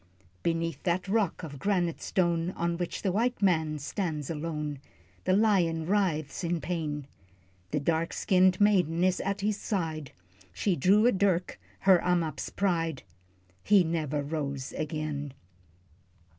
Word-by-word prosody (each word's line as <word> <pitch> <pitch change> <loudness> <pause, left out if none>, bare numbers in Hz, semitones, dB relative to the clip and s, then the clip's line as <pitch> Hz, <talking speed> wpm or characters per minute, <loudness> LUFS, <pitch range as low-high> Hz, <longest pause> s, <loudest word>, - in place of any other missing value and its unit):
Beneath 165 -3 -1
that 180 +2 0
rock 200 -3 0
of 145 -4 -7
granite 175 -2 0
stone, 170 -2 +1
On 170 0 -1
which 175 0 -4
the 190 - +1
white 240 +6 0
man 160 -6 +2
stands 150 0 -3
alone, 150 -2 -4 0.5
The 185 - +3
lion 180 -7 +2
writhes 175 -5 0
in 170 0 0
pain. 150 -5 -3 0.6
The 150 - 0
dark 165 +2 0
skinned 185 0 +3
maid 205 -6 +4
is 180 +3 +1
at 200 0 -2
his 205 0 0
side 160 -9 -3 0.4
She 180 - 0
drew 200 - +4
a 245 - +6
dirk, 190 -3 0 0.2
her 190 -2 +6
Ammap's 170 -5 0
pride, 165 -7 -1 0.6
He 200 -2 +5
never 155 -3 -1
rose 140 -3 -4
again. 150 -2 -3
170 Hz, 135 wpm, -29 LUFS, 155-190 Hz, 0.6 s, a